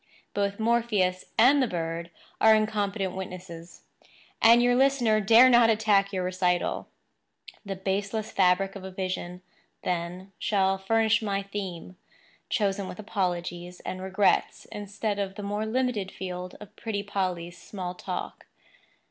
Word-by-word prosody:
Both 200 Hz, 0 st, -1 dB
Morpheus 220 Hz, -5 st, +1 dB
and 270 Hz, +5 st, +6 dB
the 255 Hz, -, +2 dB
bird 170 Hz, -2 st, -4 dB, 0.3 s
are 220 Hz, 0 st, +7 dB
incompetent 205 Hz, -3 st, -1 dB
witnesses; 180 Hz, -2 st, -8 dB, 0.6 s
and 235 Hz, +1 st, +7 dB
your 245 Hz, 0 st, +4 dB
listener 250 Hz, -5 st, +3 dB
dare 230 Hz, +5 st, +7 dB
not 240 Hz, -2 st, +6 dB
attack 210 Hz, -3 st, +3 dB
your 185 Hz, -2 st, -2 dB
recital. 180 Hz, -1 st, 0 dB, 0.8 s
The 200 Hz, -2 st, -4 dB
baseless 200 Hz, +3 st, -2 dB
fabric 190 Hz, +1 st, +2 dB
of 195 Hz, -, -8 dB
a 190 Hz, -, -6 dB
vision, 185 Hz, -1 st, -4 dB, 0.4 s
then, 180 Hz, +2 st, -3 dB
shall 195 Hz, -2 st, +1 dB
furnish 220 Hz, +3 st, +2 dB
my 200 Hz, -2 st, -1 dB
theme—chosen 195 Hz, +1 st, -5 dB
with 180 Hz, -, -8 dB
apologies 180 Hz, -4 st, -3 dB
and 185 Hz, -, -5 dB
regrets 190 Hz, 0 st, +1 dB
instead 205 Hz, 0 st, -3 dB
of 195 Hz, -1 st, -3 dB
the 205 Hz, -, -7 dB
more 205 Hz, +2 st, -2 dB
limited 230 Hz, -5 st, -1 dB
field 180 Hz, -1 st, -6 dB
of 210 Hz, -, -13 dB
pretty 210 Hz, -3 st, -3 dB
Polly's 180 Hz, -4 st, -3 dB
small 180 Hz, -1 st, -6 dB
talk. -, -, -6 dB
195 Hz, 130 wpm, -27 LUFS, 185-215 Hz, 0.8 s, are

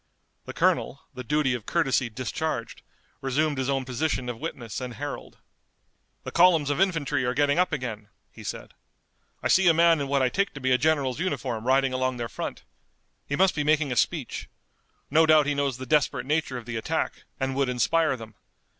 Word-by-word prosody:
The -, -, -7 dB
colonel, 140 Hz, -, +1 dB
the 130 Hz, -1 st, -7 dB
duty 145 Hz, 0 st, +1 dB
of 120 Hz, -4 st, -5 dB
courtesy 135 Hz, -7 st, +1 dB
discharged, 125 Hz, +2 st, -4 dB, 0.4 s
resumed 145 Hz, +2 st, 0 dB
his 130 Hz, 0 st, -1 dB
own 135 Hz, -1 st, 0 dB
position 130 Hz, 0 st, -2 dB
of 120 Hz, -2 st, -5 dB
witness 125 Hz, -7 st, -5 dB
and 125 Hz, -2 st, -5 dB
herald. 145 Hz, +4 st, -6 dB, 0.9 s
"The -, -, -6 dB
columns 165 Hz, -5 st, +4 dB
of 145 Hz, -, 0 dB
infantry 150 Hz, -8 st, +1 dB
are 125 Hz, 0 st, -1 dB
getting 145 Hz, +3 st, +2 dB
up 180 Hz, -, +2 dB
again," 115 Hz, -7 st, -4 dB, 0.2 s
he -, -, -12 dB
said. -, -, -6 dB, 0.7 s
"I -, -, +2 dB
see 190 Hz, -1 st, +4 dB
a 165 Hz, -, +6 dB
man 165 Hz, -2 st, +5 dB
in 140 Hz, -, -2 dB
what 140 Hz, -1 st, +2 dB
I 130 Hz, -, +3 dB
take 200 Hz, +5 st, -1 dB
to -, -, -6 dB
be 130 Hz, -1 st, 0 dB
a 125 Hz, -, +5 dB
general's 145 Hz, -2 st, +1 dB
uniform 125 Hz, -10 st, -2 dB
riding 135 Hz, 0 st, +3 dB
along 130 Hz, 0 st, -1 dB
their 120 Hz, -1 st, -3 dB
front. -, -, -6 dB, 0.6 s
He 145 Hz, -, -1 dB
must 190 Hz, +4 st, +3 dB
be 150 Hz, -, -1 dB
making 150 Hz, -2 st, +2 dB
a -, -, -1 dB
speech. -, -, -1 dB, 0.6 s
No 160 Hz, +2 st, +5 dB
doubt 155 Hz, -2 st, +6 dB
he 145 Hz, -, +1 dB
knows 140 Hz, -3 st, -1 dB
the 130 Hz, -, -7 dB
desperate 145 Hz, 0 st, +1 dB
nature 150 Hz, -2 st, -1 dB
of 120 Hz, -, -8 dB
the 120 Hz, -1 st, -4 dB
attack, 110 Hz, -, -2 dB
and 135 Hz, 0 st, -1 dB
would 135 Hz, -1 st, +1 dB
inspire 130 Hz, +5 st, +2 dB
them. 110 Hz, -2 st, -10 dB
135 Hz, 200 wpm, -26 LUFS, 125-155 Hz, 0.9 s, a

